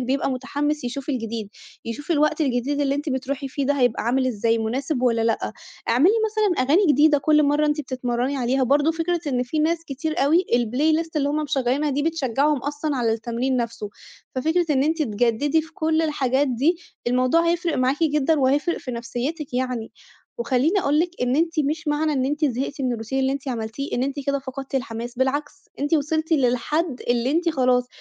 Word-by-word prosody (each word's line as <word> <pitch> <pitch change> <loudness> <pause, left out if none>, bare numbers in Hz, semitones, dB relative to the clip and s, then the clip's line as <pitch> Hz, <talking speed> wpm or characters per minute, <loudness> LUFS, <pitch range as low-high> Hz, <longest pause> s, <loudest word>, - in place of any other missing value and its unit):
الواحد 250 - -3
بيبقى 270 +2 0
مُتحمِس 290 +3 -2
يشوف 265 +3 -5
الجديد، 230 -5 -3 0.4
يشوف 260 +8 -6
الوقت 305 0 +2
الجديد 275 0 0
اللي 280 -1 +1
أنتِ 290 +2 -3
بتروحي 270 +1 -3
فيه 280 +1 -2
ده 285 - +2
هيبقى 245 -4 +1
عامل 255 +3 +1
إزاي؟ 230 -1 +1
مُناسِب 255 +4 -2
والّا 230 -2 +2
لأ، 225 -1 0 0.4
اعملي 275 - +5
مثلًا 420 - +1
أغاني 350 +8 +4
جديدة 295 +1 +5
كُلّ 300 +1 +3
مَرَّة 295 +1 +2
أنتِ 300 0 0
بتِتمَرَّني 255 0 -2
عليها، 260 +1 +1
برضه 285 +5 +3
فكرة 330 +1 -1
إن 250 -3 0
في 250 +5 -3
ناس 330 +2 +1
كتير 310 +3 -3
أوي 335 +6 +3
الPlayList 300 +8 +1
اللي 285 -1 +1
هُم 295 - -1
مِشغَّلينها 275 +1 0
دي 285 +1 0
بتشجعهُم 295 -2 +1
أصلًا 290 +1 -3
على 230 -2 +1
التمرين 235 +3 -1
نفسه، 230 -3 -3 0.4
ففكرة 320 +6 +1
إن 270 -2 +3
أنتِ 315 +2 +1
تِجَدِّدي 245 +6 +1
في 325 +1 -15
كُلّ 320 0 +1
الحاجات 280 -3 +1
دي، 275 +8 +1 0.3
الموضوع 255 +7 +3
هيفرق 340 -1 0
معاكِ 260 +4 +1
جدًا، 300 0 +2
وهيفرِق 285 +6 +1
في 255 - -7
نفسيتِك 250 +5 -4
يعني، 250 -3 -2 0.5
وخَلّيني 265 - +2
أقول 295 -2 +1
لِك 345 +1 0
إن 250 +2 +1
أنتِ 330 -1 +1
مش 300 +2 -2
معنى 300 +1 +1
إن 260 -2 0
أنتِ 295 +3 0
زهِقتي 275 +2 -2
من 250 -2 0
الRoutine 225 +2 -9
اللي 265 0 +1
أنتِ 275 0 -5
عملتيه، 230 +3 -4
إن 245 - 0
أنتِ 275 +2 -2
كده 280 0 +1
فقدتِ 270 0 -8
الحماس، 240 -1 -3
بالعكس 285 +3 0 0.3
أنتِ 290 +3 +1
وِصِلتِ 315 +2 0
للحد 275 +2 +1
اللي 240 +1 +1
أنتِ 335 +3 +1
خلاص، 250 -4 +2
275 Hz, 190 wpm, -23 LUFS, 250-305 Hz, 0.5 s, اعملي